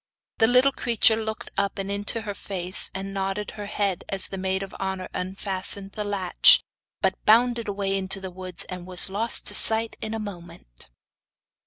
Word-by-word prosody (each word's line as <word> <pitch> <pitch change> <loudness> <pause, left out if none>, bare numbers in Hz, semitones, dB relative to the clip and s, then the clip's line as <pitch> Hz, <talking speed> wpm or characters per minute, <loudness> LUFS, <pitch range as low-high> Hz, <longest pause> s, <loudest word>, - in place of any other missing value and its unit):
The 225 - +5
little 250 +3 +4
creature 230 -3 +2
looked 220 -1 -6
up 200 0 -2
and 195 0 -4
into 205 +3 -2
her 205 -2 -6
face, 185 -2 +1
and 195 0 -5
nodded 195 +1 -3
her 205 -1 -8
head 200 -3 -2
as 195 -1 +1
the 195 - -6
maid 190 +1 -1
of 195 - -10
honour 190 -1 -4
unfastened 195 +1 -4
the 210 - -4
latch, 200 -3 +4 0.4
but - - -1
bounded 235 +1 +3
away 195 -1 -1
into 195 0 0
the 190 -1 -8
woods, 185 -1 -5
and 180 -1 -8
was 185 +1 -1
lost 225 +4 0
to - - 0
sight 225 0 +7
in 220 +1 -4
a - - -4
moment. 170 - -11
195 Hz, 180 wpm, -24 LUFS, 190-215 Hz, 0.4 s, sight